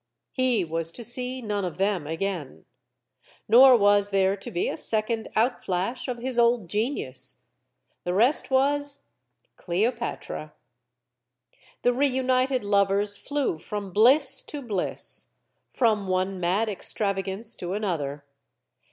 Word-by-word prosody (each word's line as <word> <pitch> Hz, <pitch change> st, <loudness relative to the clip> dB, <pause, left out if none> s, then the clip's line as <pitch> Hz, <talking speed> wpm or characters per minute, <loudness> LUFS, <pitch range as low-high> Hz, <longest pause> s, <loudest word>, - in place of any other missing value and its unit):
He 255 Hz, -7 st, 0 dB
was 165 Hz, 0 st, -3 dB
to 240 Hz, -, -8 dB
see 250 Hz, +2 st, -3 dB
none 205 Hz, -2 st, -2 dB
of 180 Hz, -3 st, -5 dB
them 190 Hz, -5 st, -1 dB
again. 160 Hz, -, -5 dB, 0.8 s
Nor 250 Hz, +3 st, +7 dB
was 205 Hz, -1 st, +3 dB
there 195 Hz, -1 st, +2 dB
to 195 Hz, -, -8 dB
be 175 Hz, -, -2 dB
a -, -, -3 dB
second 220 Hz, +1 st, +2 dB
outflash 225 Hz, -1 st, -1 dB
of 250 Hz, -2 st, -3 dB
his 245 Hz, 0 st, -2 dB
old 235 Hz, -7 st, +2 dB
genius. 210 Hz, -, -3 dB, 0.6 s
The 180 Hz, 0 st, -2 dB
rest 240 Hz, +9 st, +3 dB
was 285 Hz, +1 st, 0 dB, 0.5 s
Cleopatra. 200 Hz, -5 st, -3 dB, 1.3 s
The 245 Hz, -, +3 dB
reunited 260 Hz, -1 st, +1 dB
lovers 200 Hz, 0 st, +2 dB
flew 275 Hz, -, -3 dB
from 200 Hz, +1 st, -6 dB
bliss 245 Hz, -, +5 dB
to 290 Hz, -2 st, -7 dB
bliss, 205 Hz, -6 st, +1 dB, 0.3 s
from 215 Hz, -5 st, 0 dB
one 185 Hz, +1 st, -1 dB
mad 185 Hz, +6 st, 0 dB
extravagance 200 Hz, +1 st, -1 dB
to 180 Hz, +1 st, -5 dB
another. 150 Hz, -9 st, -3 dB
210 Hz, 120 wpm, -25 LUFS, 190-250 Hz, 1.3 s, Nor